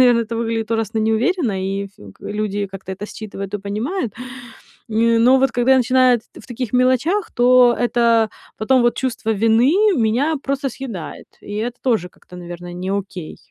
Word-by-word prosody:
наверно, 245 -2 +5
это 230 0 -4
выглядит 225 -1 -2
ужасно 225 0 -2
неуверенно, 225 - +1
и 195 +1 -2
ф 195 - -19 0.2
к - - -30
люди 205 -1 -3
как-то 190 0 -8
это 205 +2 -7
считывают 200 -2 -7
и - - -1
понимают. 215 - -3 0.8
Нь 230 +1 +2
но 255 +3 +5
вот 270 - +2
когда 245 +2 +2
я 265 - +6
начинаю 255 0 +4
эт - - -28 0.2
в - - -17
таких 245 -1 -5
мелочах, 260 - +2
то 245 0 +5
это 235 -2 +3 0.3
потом 250 +4 +2
вот 240 - +2
чувство 245 -4 -2
вины 225 - +3 0.2
меня 245 +8 +1
просто 275 0 -2
съедает, 225 - -8
и 205 - -9
это 235 +3 -3
тоже 220 -9 0
как-то, 180 - -17
наверно, 175 0 -8
не 185 +2 -4
окей. 190 -4 -5
230 Hz, 180 wpm, -19 LUFS, 205-255 Hz, 0.8 s, я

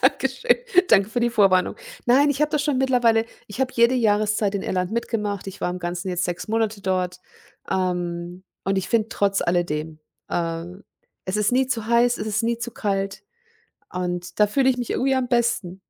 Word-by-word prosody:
Danke - - +3
schön. 485 - +1 0.3
Danke 200 -1 +4
für 240 - -1
die 240 - +3
Vorwarnung. 195 -5 +3 0.3
Nein, 275 +4 +5
ich 285 +1 -2
habe 300 - +2
das 295 -1 +1
schon 285 -3 0
mittlerweile 240 -4 +3 0.2
ich 205 +5 -8
habe 260 -1 0
jede 235 +2 +4
Jahreszeit 210 -3 +1
in 195 - -2
Irland 180 0 -1
mitgemacht. 210 -4 -2
Ich 195 0 -8
war 180 - 0
im 180 - -4
Ganzen 175 +2 -4
jetzt 180 0 -1
6 180 +3 -4
Monate 220 -2 0
dort, 185 -1 -1 0.5
ähm, 175 -1 -2 0.2
und 195 0 +1
ich 190 - -4
finde 225 -2 +1
trotz 200 -3 0
alledem 160 -3 -1 0.3
äh, 165 -1 -2 0.6
es 185 +2 -2
ist 210 +2 +1
nie 260 +1 +3
zu 230 -4 -2
heiß, 235 +1 +3
es 215 - -4
ist 215 +1 0
nie 230 0 0
zu 240 0 -4
kalt 195 -2 -2 0.7
und 180 -1 -4
da 210 - +7
fühle 265 +5 +2
ich 255 - +3
mich 245 -2 -4
irgendwie 270 +1 +1
am 260 -1 0
besten. 235 -7 0
210 Hz, 195 wpm, -23 LUFS, 180-235 Hz, 0.7 s, da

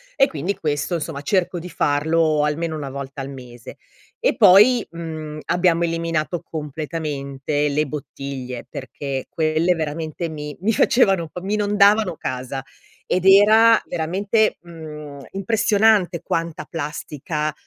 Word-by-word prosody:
E 275 -1 +5
quindi 170 +6 -3
questo 150 +3 -1
insomma 150 -3 -4
cerco 180 +1 0
di 180 +2 -8
farlo 155 +1 +1
almeno 160 +2 -1
una 145 -3 -5
volta 140 0 -6
al 135 - -6
mese. 125 -3 -11 0.4
E - - +2
poi, 215 +4 +6
mhmm, 155 -2 -7
abbiamo 175 -1 +2
eliminato 165 0 -2
completamente 150 -2 -3
le 150 +2 +1
bottiglie. 135 -3 -6
Perché 135 0 -5
quelle 160 +2 +1
veramente 160 +1 -3
mi 150 -2 -7
mi 220 +3 +1
facevano 195 -8 +3
un 160 - -9
po' 180 - -8
mi 200 +3 -3
inondavano 205 -2 +3
casa, 130 +1 -4 0.5
ed 185 +1 0
era 215 +4 +7
veramente, 195 +6 0
mhmm, 155 -4 -9
impressionante 205 -3 +2
quanta 165 -4 -3
plastica 150 -1 -4
160 Hz, 130 wpm, -21 LUFS, 145-185 Hz, 0.5 s, era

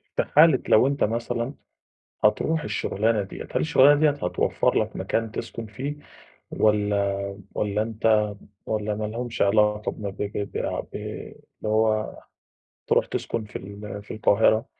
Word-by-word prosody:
في - - +2
حالة 155 -3 +5
لو 115 +4 +6
أنت 140 0 0
مثلًا 115 +3 -1 0.7
هتروح 155 +9 +2
الشغلانة 105 +1 0
دِيَّة، 95 - -8
هل - - 0
الشغلانة 135 - +5
دِيَّة 155 0 +5
هتوفر 140 -11 0
لك - - -2
مكان 115 -1 -2
تسكُن 115 +1 -6
فيه؟ 130 +7 -5 0.6
والّا 105 -2 +1 0.4
والّا 105 0 0
أنت 110 -1 +2 0.4
والّا 105 -1 -1
ما 105 +1 -3
لهُمش 115 +2 -4
علاقة 105 +1 +3
بم 100 -2 -5
ب - - -17
ب 100 0 -3
بع - - -2
ب - - -9
اللي - - -7 0.3
هو 110 0 +1 0.7
تروح - - +3
تسكن 115 - -3
في 105 - -18
ال 100 +1 -7
في - - -10
القاهرة؟ 110 +2 +3
110 Hz, 145 wpm, -25 LUFS, 105-115 Hz, 0.7 s, لو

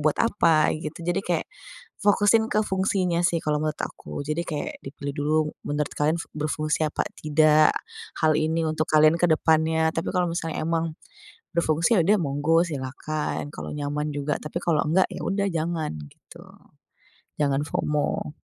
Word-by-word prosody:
buat 150 0 +2
apa 165 -9 +3
gitu. 155 +2 -6
Jadi 175 +2 0
kayak 175 -4 -1 0.6
fokusin 205 +2 +4
ke 215 0 +1
fungsinya 190 -3 0
sih, 175 -1 +2
kalau 150 0 +1
menurut 155 -1 -1
aku. - - -5
Jadi 155 +3 -2
kayak 150 -3 -4
dipilih 140 +1 -6
dulu, 150 +2 0 0.3
menurut 145 0 -1
kalian 155 +3 +1
se - - -5
berfungsi 155 0 -1
apa - - -2 0.2
tidak, 155 0 +4 0.5
hal 155 - +5
ini 160 +2 +1
untuk 155 0 -1
kalian 155 +2 +5
kedepannya. 160 -1 +3
Tapi 165 - -3
kalau 180 -1 +2
misalnya 165 -2 -3
memang 165 -1 -1 0.6
berfungsi, 165 +5 +2
iya 175 - +5
sudah 205 +5 +4
monggo, 150 +3 +2
silahkan 145 +1 -4
kalau - - -6
nyaman 150 +1 -3
juga. 145 0 -2
Tapi 150 +3 -4
kalau 165 -3 +1
enggak, 175 +5 +3
iya - - -6
sudah 200 +1 0
jangan 165 - -2 0.2
gitu. - - -16 1.0
Jangan 140 -1 +2
FOMO. 150 0 -2
155 Hz, 155 wpm, -25 LUFS, 150-170 Hz, 1.0 s, hal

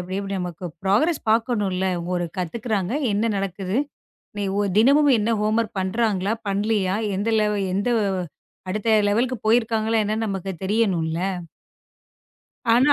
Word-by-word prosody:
இப்படி 185 +2 -3 0.2
நமக்கு 180 -1 -5 0.2
ப்ரோக்ரெஸ் 275 - +2
பாக்கணும் 225 -3 +1
இல்ல. 190 +1 0 0.3
ஒரு 175 -1 0
கத்துக்கிறாங்க. 200 +2 -2 0.2
என்ன 220 +3 +1
நடக்குது? 195 +1 -3 0.6
நி 205 - -1 0.2
ஒ - - +2 0.2
தினமும் 285 +5 +5
என்ன 215 +2 0
ஹோம் 215 +1 +1
வோர்க் 225 -2 -4
பண்றாங்களா? 200 0 0 0.2
பண்ணலையா? 200 -1 +1 0.2
எந்த 205 +4 -1
லெவ 210 0 +2 0.2
எந்த 205 +5 0 0.8
அடுத்த 210 +4 -2 0.2
லெவல்க்கு 240 +5 +1
போயிருக்காங்களா? 225 -1 +2
என்ன 215 - -1
நமக்குத் 195 -3 -4
தெரியணும்ல. 190 -6 +1 1.5
ஆனா 260 +5 +5
210 Hz, 125 wpm, -23 LUFS, 190-230 Hz, 1.5 s, தினமும்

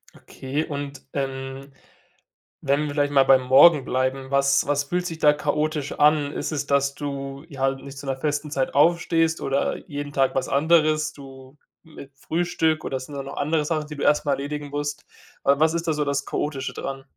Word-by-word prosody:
Okay, 135 +4 -4
und, 145 -2 -6
ähm, 135 0 -5 0.9
wenn 140 +2 +1
wir 150 - -2
vielleicht 145 0 0
mal 135 -1 +6
beim 130 -1 +5
Morgen 135 +3 +6
bleiben, 130 +1 -1
was 140 0 +3
was 145 0 +1
fühlt 175 +5 -2
sich 165 -2 -4
da 150 - +6
chaotisch 150 0 -1
an? 150 -1 +3
Ist - - -3
es, 145 -2 -3
dass 140 -1 +2
du 140 0 -6
ja 140 -5 -9
halt 135 0 0
nicht 140 0 -10
zu 140 - -9
'ner 135 -1 -2
festen 150 +1 -2
Zeit 135 -2 -1
aufstehst 165 +1 +3
oder 135 0 -1
jeden 145 0 -5
Tag 135 -2 +1
was 135 - -1
anderes 155 0 +2
du 135 0 -13 0.3
mit 155 -4 -13
Frühstück 160 0 0
oder 130 -1 -3
sind 140 +3 -9
da 140 - -4
noch 140 - -9
andere 155 +1 0
Sachen, 155 0 -2
die 150 - -8
du 140 - -5
erst 150 - +3
mal 140 - +2
erledigen 145 +2 -4
musst? 145 0 -4 0.4
Wa 140 0 +4
was 160 +2 +3
ist 170 0 -3
da 160 - +2
so 150 - -1
das 140 0 -1
Chaotische 140 -3 -3
dran? 135 0 -6
145 Hz, 200 wpm, -24 LUFS, 135-150 Hz, 0.9 s, mal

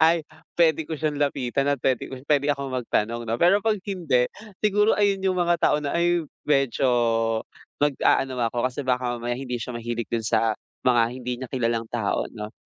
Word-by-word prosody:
"Ay, 165 +1 +5 0.4
puwede 160 -2 +3
ko - - -5
siyang 150 -1 -1
lapitan 135 -2 0
at 140 -3 0
puwede 130 -2 0
ko - - -4
puwede 145 -1 +3
akong 140 -2 -5
magtanong 115 -1 -1
'no." 115 - 0
Pero 185 +4 +5
'pag 220 -1 +2
hindi, 145 -11 +1 0.4
siguro 210 +1 +4
ayun 200 -2 +1
yung 185 -1 +1
mga 175 0 +3
tao - - +4
na, 140 -1 -3
"Ay, 175 0 +2 0.2
medyo 135 -3 +2 0.9
mag-aano 135 -2 +2 0.2
ako 120 0 -1
kasi 130 - -6
baka 125 -1 0
mamaya 120 +1 -3
hindi 125 -2 -4
siya 120 +2 -5
mahilig 120 0 -3
din 115 -1 -1
sa 110 0 +2 0.3
mga 120 -2 +5
hindi 125 0 -5
niya 130 - -5
kilalang 115 -3 -1
tao 115 -4 -1
'no." 105 -1 -8
130 Hz, 185 wpm, -24 LUFS, 120-160 Hz, 0.9 s, Ay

